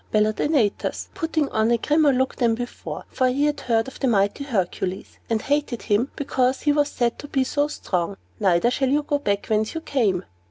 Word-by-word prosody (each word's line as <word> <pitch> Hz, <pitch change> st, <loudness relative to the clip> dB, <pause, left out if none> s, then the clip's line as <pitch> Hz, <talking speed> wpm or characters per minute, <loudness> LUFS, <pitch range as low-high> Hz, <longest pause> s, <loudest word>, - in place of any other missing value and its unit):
bellowed 215 Hz, 0 st, +2 dB
Antaeus, 265 Hz, -10 st, 0 dB
putting 325 Hz, -5 st, 0 dB
on 220 Hz, +1 st, +1 dB
a 235 Hz, -, +4 dB
grimmer 295 Hz, +4 st, +3 dB
look 260 Hz, 0 st, 0 dB
than 235 Hz, -3 st, +2 dB
before; 245 Hz, +1 st, -6 dB
for 255 Hz, -, +2 dB
he 270 Hz, +3 st, +1 dB
had 295 Hz, -1 st, 0 dB
heard 225 Hz, -1 st, +1 dB
of 265 Hz, -, -10 dB
the 270 Hz, -, +1 dB
mighty 205 Hz, +3 st, +1 dB
Hercules, 190 Hz, -6 st, -3 dB
and 225 Hz, -1 st, 0 dB
hated 285 Hz, -4 st, -1 dB
him 225 Hz, +5 st, +1 dB
because 260 Hz, -2 st, 0 dB
he 295 Hz, -, +3 dB
was 290 Hz, 0 st, +2 dB
said 240 Hz, -3 st, -1 dB
to 290 Hz, -, -8 dB
be 270 Hz, -2 st, +1 dB
so 290 Hz, +2 st, 0 dB
strong. 190 Hz, -, -2 dB, 0.2 s
"Neither 195 Hz, +3 st, +3 dB
shall 265 Hz, 0 st, +1 dB
you 295 Hz, +2 st, +2 dB
go 290 Hz, 0 st, 0 dB
back 200 Hz, -7 st, -1 dB
whence 215 Hz, +3 st, 0 dB
you 325 Hz, -, -3 dB
came!" 215 Hz, -, 0 dB
250 Hz, 205 wpm, -23 LUFS, 215-285 Hz, 0.2 s, a